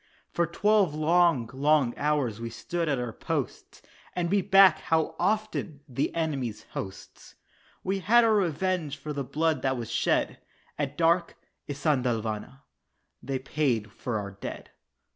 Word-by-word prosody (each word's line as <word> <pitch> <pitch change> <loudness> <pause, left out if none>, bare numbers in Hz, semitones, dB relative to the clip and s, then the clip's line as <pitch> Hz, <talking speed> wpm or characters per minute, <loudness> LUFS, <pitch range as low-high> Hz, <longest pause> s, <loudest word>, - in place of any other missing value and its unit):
For 170 -1 +1
twelve 200 -2 +2
long, 160 -5 +3
long 140 -2 +2
hours 140 -7 0
we 115 - -4
stood 165 +9 -3
at 140 - +1
our 120 -2 -3
posts, - - -4 0.3
And 175 -1 -1
beat 200 -1 +1
back, 195 -4 +7
how 160 0 0
often! 200 -6 -1
the 130 +1 -1
enemy's 135 -10 -2
hosts. 95 -1 -8 0.5
We 195 +1 -1
had 230 +6 +5
our 225 -1 +4
revenge 180 -5 0
for 150 +2 -6
the 140 -1 -2
blood 160 +4 0
that 130 -1 0
was 115 -2 -5
shed, - - +1 0.4
At 145 0 -2
dark 170 +1 +2 0.3
"Isandhlwana" 125 -4 -1 0.6
they 135 +1 -2
paid 130 -6 -1
for 120 +1 -3
our 100 -1 -5
dead. 100 - -8
150 Hz, 145 wpm, -27 LUFS, 125-175 Hz, 0.6 s, back